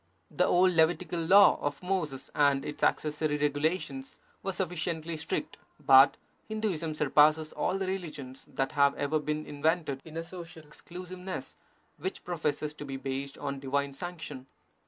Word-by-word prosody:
The - - +2
old 185 +1 +5
Levitical 170 +1 +2
Law 190 +5 +7
of 145 +3 -3
Moses 175 -8 -2
and 140 -2 +3
its 150 - -6
accessory 150 0 +1
regulations 160 - -1 0.2
were 195 - -2
sufficiently 170 -3 -3
strict, 160 +1 -4 0.2
but 135 -1 +7 0.3
Hinduism 185 -8 -2
surpasses 150 +1 +4
all 190 - 0
the 195 - -2
religions 155 -9 -5
that 135 0 -1
have 140 0 +3
ever 150 +2 0
been 150 +1 -3
invented 150 -2 -1
in 160 0 -9
a 165 - -2
social 165 -2 -10
exclusiveness 180 +4 -7 0.4
which 380 0 -4
professes 150 -3 -2
to 150 - -8
be 135 -2 -5
based 135 +1 -4
on 140 0 -4
divine 140 +1 -1
sanction. 150 -4 -7
155 Hz, 145 wpm, -30 LUFS, 145-180 Hz, 0.4 s, Law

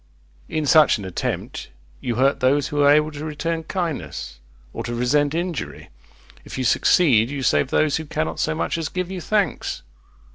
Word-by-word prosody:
In 155 -1 -1
such 155 -1 +5
an 100 - -7
attempt 95 - -4 0.3
you 120 - -3
hurt 135 +4 +2
those 135 +2 +2
who 145 -2 0
are 140 - +6
able 150 +1 +3
to 150 0 -7
return 160 +2 -3
kindness, 155 - -4 0.3
or - - -5
to 120 - -4
resent 145 +5 +1
injury. 175 -3 -4 0.5
If - - -8
you 130 - -1
succeed, 125 -5 +4
you 140 -1 -4
save 130 - +2
those 155 0 +2
who 160 - -5
cannot 155 +1 -3
so 155 - 0
much 165 - -2
as 160 - -3
give 185 0 -3
you 185 -2 -5
thanks. 205 -1 -1
150 Hz, 180 wpm, -22 LUFS, 135-165 Hz, 0.5 s, are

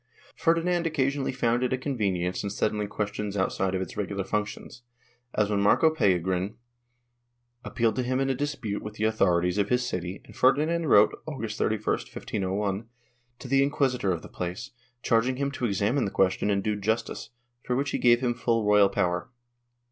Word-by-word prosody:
Ferdinand 170 +1 +1
occasionally 140 -2 0
found 120 -2 +1
it 125 - 0
a 130 - +1
convenience 100 -10 -1
in 100 - -2
settling 105 +1 -1
questions 105 0 -3
outside 95 0 0
of 95 - -1
its - - -9
regular 100 -1 -2
functions, 105 +4 -4 0.5
as 105 - +2
when 100 -1 +1
Marco 155 +10 +4
Pellegrin 95 - +1 1.1
appealed 115 -3 0
to - - +2
him 130 +1 0
in 135 - +1
a 135 - +1
dispute 125 -7 -3
with 105 0 -7
the 110 - -4
authorities 90 -4 +2
of 100 - +1
his 125 0 +1
city 90 -2 -4
and - - -15
Ferdinand 155 +6 +2
wrote, 105 -5 +6
August 115 -8 -5
31, 110 -1 0
1501, 100 +2 -2 0.5
to 130 - -9
the 135 +1 +3
inquisitor 130 -7 +1
of 85 -3 -3
the - - -9
place, 90 +9 -5 0.3
charging 120 +3 +2
him 140 +1 -1
to 130 -3 -3
examine 110 +5 +1
the - - -1
question 95 +2 +1
and 100 -1 +1
do 105 0 0
justice, 110 +3 -2 0.3
for 125 - -2
which 135 +1 -1
he - - -1
gave 120 0 +4
him 125 -2 +1
full 115 -2 0
royal 105 -1 +5
power. 90 -2 -1
110 Hz, 180 wpm, -27 LUFS, 100-130 Hz, 1.1 s, wrote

